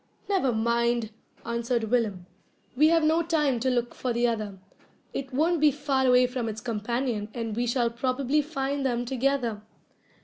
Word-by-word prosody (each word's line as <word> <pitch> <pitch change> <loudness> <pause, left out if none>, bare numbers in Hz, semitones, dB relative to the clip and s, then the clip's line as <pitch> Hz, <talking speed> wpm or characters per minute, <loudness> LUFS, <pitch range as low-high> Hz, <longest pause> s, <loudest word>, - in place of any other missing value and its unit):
"Never 375 -11 +2
mind," 235 0 +1 0.3
answered 235 0 -1
Willem, 210 -7 0 0.5
"we 300 +4 +5
have 330 0 +4
no 320 +2 +3
time 300 -7 +1
to 260 +3 0
look 240 -1 0
for 255 - -3
the 240 +1 +1
other. 215 -4 -3 0.6
It 270 -1 -4
won't 320 +4 +1
be 305 - +7
far 275 -2 0
away 250 0 +6
from 250 -2 -3
its 215 0 -5
companion, 225 0 -2
and 230 -3 -3
we 240 +1 0
shall 240 -1 +1
probably 255 +4 0
find 280 -2 -2
them 245 -2 0
together." 250 -4 0
250 Hz, 165 wpm, -27 LUFS, 235-275 Hz, 0.6 s, be